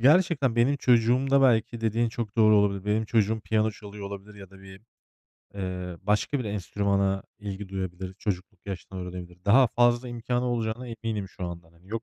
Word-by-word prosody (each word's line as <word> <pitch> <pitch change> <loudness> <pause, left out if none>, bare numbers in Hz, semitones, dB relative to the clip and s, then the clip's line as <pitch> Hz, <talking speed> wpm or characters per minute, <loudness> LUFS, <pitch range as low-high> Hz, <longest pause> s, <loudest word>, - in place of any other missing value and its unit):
gerçekten 140 -3 +4
benim 130 +5 +3
çocuğumda 130 +2 +3
belki 120 -2 +3
dediğin 115 +1 +1
çok 115 -3 -5
doğru 110 -1 +6
olabilir. 100 -1 +2
Benim 105 +2 +1
çocuğum 110 0 +1
piyano 110 0 +1
çalıyor 100 -1 -9
olabilir 100 +1 -8
ya 95 -2 -12
da 95 0 -15
bir, 95 0 -12 0.7
eee, 90 -2 -4
başka 105 +7 +1
bir 125 - -3
enstrümana 100 -1 0 0.2
ilgi 100 -1 -6
duyabilir. 95 -1 -5
Çocukluk 95 -2 -5
yaşta 95 0 -6
öğrenebilir. 90 -1 -8
Daha 125 +6 +6
fazla 120 +2 +2
imkânı 120 +1 -2
olacağına 120 0 -2
eminim 110 -4 -4
şu 95 - -7
andan. 85 -1 -7
Hani 85 +3 -22
yok, 115 +1 -3
105 Hz, 170 wpm, -27 LUFS, 95-120 Hz, 0.7 s, doğru